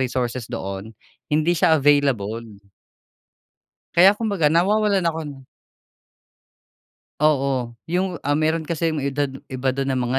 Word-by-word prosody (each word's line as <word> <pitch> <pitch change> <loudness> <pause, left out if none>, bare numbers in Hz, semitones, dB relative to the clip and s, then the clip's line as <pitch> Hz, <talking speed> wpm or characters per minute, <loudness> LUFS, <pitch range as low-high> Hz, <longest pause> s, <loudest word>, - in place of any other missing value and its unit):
resources 125 -2 -2
doon 100 -2 -6 0.4
hindi 155 +3 +2
siya 160 - +4
available. 115 -7 +1 1.3
Kaya 185 +4 +7
kumbaga 205 -7 0
nawawalan 195 +5 +2
ako 155 -4 -4 1.8
Oo 135 -5 +1
yung, 180 +2 -1
ah, 145 - +1
meron 160 +2 +1
kasi 165 +1 -1
yung 160 - -2
edad 140 +1 -1 0.2
iba 130 +1 -2
dun 135 0 -1
ng 130 - -1
mga 130 +2 +1
145 Hz, 120 wpm, -22 LUFS, 130-165 Hz, 1.8 s, Kaya